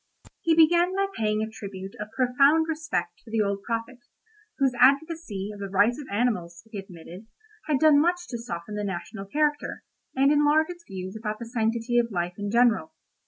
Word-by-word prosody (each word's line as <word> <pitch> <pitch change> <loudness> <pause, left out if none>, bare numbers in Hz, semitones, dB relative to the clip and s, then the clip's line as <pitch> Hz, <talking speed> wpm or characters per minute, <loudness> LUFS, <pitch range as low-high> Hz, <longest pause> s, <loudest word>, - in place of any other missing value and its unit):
He 330 -1 +3
began 345 +3 +4
by 395 0 +2
paying 215 0 0
a - - -3
tribute 195 -3 -8
of 210 0 -5
profound 275 +5 +4
respect 315 -1 -3
to - - -17
the 220 -1 +1
old 200 -1 -2
prophet, 230 +3 -4 0.6
whose 270 -3 +2
advocacy 275 - +2
of 205 - -11
the 200 -1 -5
rights 205 +8 +2
of 275 - -11
animals, 200 -7 -1
he 210 - -5
admitted, 185 +2 -11 0.4
had 300 -3 +2
done 300 0 +6
much 355 +2 0
to 240 - -4
soften 210 -4 -6
the 210 0 -3
national 195 +1 -5
character, 295 +5 -1 0.3
and 275 +2 +4
enlarge 300 +2 +3
its 350 -1 -11
views 190 0 -6
about 215 -1 -4
the 235 - -7
sanctity 230 +1 0
of 235 -1 0
life 175 -2 -2
in 205 0 -3
general. 225 -9 +2
230 Hz, 185 wpm, -26 LUFS, 200-295 Hz, 0.6 s, done